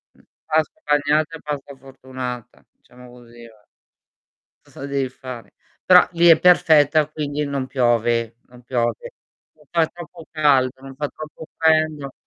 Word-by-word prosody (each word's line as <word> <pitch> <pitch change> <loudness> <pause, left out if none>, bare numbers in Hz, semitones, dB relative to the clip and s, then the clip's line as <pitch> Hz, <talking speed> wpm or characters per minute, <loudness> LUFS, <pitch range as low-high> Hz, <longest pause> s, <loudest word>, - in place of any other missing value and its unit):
Mhmm, - - -26 0.2
pasta 160 - 0
bagnata 150 +2 +1
e - - -21
pasta 145 -2 -6
fortunata, 130 -2 -9
diciamo 125 0 -18
così 120 -1 -15
va. 110 -2 -22 1.0
Cosa 135 - -10
devi 140 -2 -2
fare? 125 -2 -10 0.3
Però 180 -1 +7
lì 170 0 +3
è 165 -2 +7
perfetta 155 -4 +4
quindi 150 -1 -3
non 140 -2 -3
piove 120 -2 0
non 125 0 -16
piove. 120 -2 -2 0.4
Non 150 -1 -25
fa 165 -1 +2
troppo 170 -1 -12
caldo, 135 -5 +2
non 135 0 -11
fa 145 +2 -3
troppo 155 +1 -10
freddo. 155 -3 +1
140 Hz, 140 wpm, -21 LUFS, 125-155 Hz, 1.0 s, Però